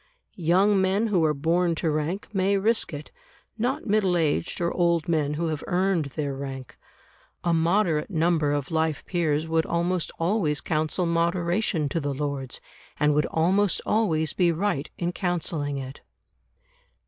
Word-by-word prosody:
Young 190 +4 +4
men 195 +4 +1
who 180 -5 +2
are 155 - +2
born 170 +4 +1
to 160 -1 0
rank 155 +6 -2
may 195 +1 +2
risk 220 +4 +1
it, 145 -1 -8 0.5
not 260 +6 -1
middle 200 -5 +2
aged 160 0 0
or 170 0 0
old 170 -3 +1
men 150 -3 0
who 165 +1 -1
have 155 -2 -3
earned 180 -3 +1
their 140 0 -3
rank. 135 -2 -7 0.7
A 170 - +2
moderate 165 -1 +2
number 165 -4 +1
of 145 0 -2
life 160 -1 0
peers 160 -3 0
would 160 0 +1
almost 175 0 0
always 165 -4 +1
counsel 155 +3 -1
moderation 170 0 0
to 165 - -1
the 145 -2 -2
Lords, 140 -3 -3 0.4
and 150 0 +3
would 150 +1 +2
almost 185 +5 +2
always 160 -8 +1
be 175 -2 +3
right 170 -4 -1
in 175 0 -1
counselling 170 -6 -2
it. 135 0 -7
165 Hz, 155 wpm, -25 LUFS, 150-185 Hz, 0.7 s, Young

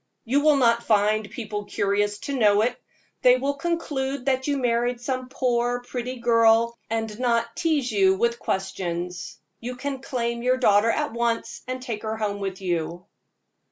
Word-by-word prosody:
You 270 +5 +2
will 300 0 +5
not 235 -3 +3
find 215 -1 +2
people 210 -3 -5
curious 205 +1 0
to 280 +5 -4
know 210 -4 +4
it. 245 +2 0 0.5
They 250 0 +6
will 275 +2 -1
conclude 280 -4 -2
that 265 0 0
you 285 -1 +1
married 240 -1 0
some 255 +1 -3
poor, 245 -1 0
pretty 250 +1 -4
girl, 230 -1 +4
and 225 -1 -3
not 235 -2 0
tease 295 -7 0
you 190 -2 +4
with 235 +4 0
questions. 180 -2 -3 0.2
You 250 +2 -5
can 270 +1 -4
claim 235 -3 -2
your 255 +1 +2
daughter 210 -3 +4
at 295 +1 0
once, 235 -1 -1
and 255 0 -4
take 230 -5 -4
her 220 0 -3
home 205 -2 -2
with 195 -1 -4
you." 175 -1 -2
235 Hz, 165 wpm, -24 LUFS, 210-255 Hz, 0.5 s, They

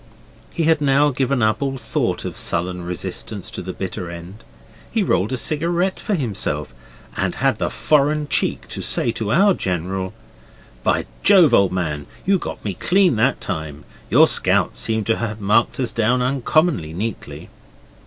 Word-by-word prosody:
He 165 - -2
had 160 -1 +3
now 145 +1 +3
given 130 -1 0
up 110 +5 +1
all 135 -1 -1
thought 115 -3 -2
of - - -5
sullen 90 +1 -1
resistance 90 0 -4
to - - -6
the - - -5
bitter 90 - -5
end. 85 +6 -10 0.5
He 225 -3 0
rolled 95 - +1
a 130 - -1
cigarette 170 +8 0
for 210 - -1
himself, 115 - -2 0.4
and - - -1
had - - +1
the - - 0
foreign 150 0 +1
cheek - - 0
to - - -5
say 120 - +1
to 110 -2 -3
our 195 - +5
Colonel 95 - -3 0.7
'By - - +1 0.2
Jove, 180 -9 +6
old 100 -4 +4
man, 75 -6 -3 0.2
you 195 0 +3
got - - -7
me 100 - -1
clean 180 - +2
that 125 +5 +2
time! 80 -5 -5 0.3
Your - - +7
scouts - - +1
seem 110 -1 -1
to 115 +1 0
have 110 -2 -4
marked 105 +5 +2
us 125 - 0
down 120 +3 +1
uncommonly 135 - +1
neatly. 105 +5 -6
115 Hz, 165 wpm, -20 LUFS, 95-150 Hz, 0.7 s, Your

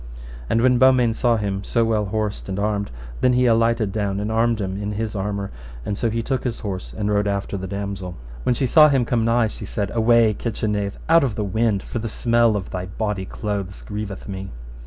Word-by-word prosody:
And 115 +1 +2
when 125 -1 +4
Beaumains 125 -3 +4
saw 120 -2 +3
him 100 -2 -2
so 115 +2 +1
well 110 -2 +1
horsed 105 0 -3
and 95 - -3
armed, 100 0 -1 0.3
then 125 - +3
he 125 +1 +3
alighted 115 -2 +3
down 100 -1 -1
and 105 +1 -2
armed 115 0 +2
him 95 0 -3
in 105 0 -3
his 110 +1 -3
armour, 100 0 -3 0.3
and 100 - -2
so 115 +3 0
took 115 +3 -1
his 120 -2 -3
horse 95 -4 -5
and 105 -1 -2
rode 105 0 +2
after 100 0 -2
the 95 -1 -4
damosel. 100 -2 -5 0.3
When 120 - +1
she 130 - 0
saw 150 +4 +7
him 135 -4 +2
come 115 -1 +1
nigh, 115 +1 +3
she - - -8
said, 100 -2 -2
Away, 115 -1 +4
kitchen 110 0 -2
knave, 100 -1 -2
out 165 -1 +6
of 125 -6 -1
the 105 - -1
wind, 105 0 0
for 120 - -4
the 115 0 -4
smell 115 0 +2
of 95 -2 -4
thy 90 0 -4
bawdy 100 0 -3
clothes 100 -3 -4
grieveth 105 -1 -6
me. 95 -1 -5
105 Hz, 220 wpm, -22 LUFS, 100-115 Hz, 0.3 s, saw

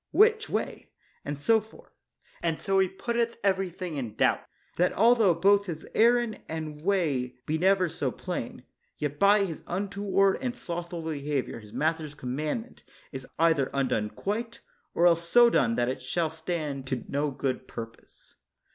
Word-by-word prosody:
"Which 435 +1 +4
way?" - - -3 0.3
and 145 0 -4
so 220 +10 +3
forth; 220 +1 -18 0.5
and 165 -2 -1
so 195 -1 +1
he 190 - +4
putteth 235 +5 -2
every 190 -1 +1
thing 175 -3 -6
in 115 -6 -4
doubt, - - +3 0.4
that 180 +1 +2
altho 225 -4 +5
both 200 +3 +4
his 160 -3 -5
errand 235 -1 +3
and 155 -2 -5
way 155 -9 0
be 155 +1 -1
never 190 0 +3
so - - -1
plain, - - -5 0.3
yet 145 -1 -3
by 200 0 +5
his 165 -5 -6
untoward 195 +1 +1
and 250 -2 -2
slothful 170 -2 -5
behavior 145 -5 -3
his 105 -2 -14
master's 155 0 -1
commandment 150 - -4 0.3
is 130 -2 -7
either 160 -5 +3
undone 125 -6 0
quite, 225 - -4 0.3
or 170 - +3
else 170 -1 +3
so 240 +4 +7
done 115 - +2
that 120 0 +1
it 130 +1 -3
shall 160 +5 -1
stand 160 -5 -4
to 130 -2 -3
no 145 +1 0
good 130 -1 -3
purpose. 115 -1 -11
170 Hz, 160 wpm, -28 LUFS, 145-200 Hz, 0.5 s, so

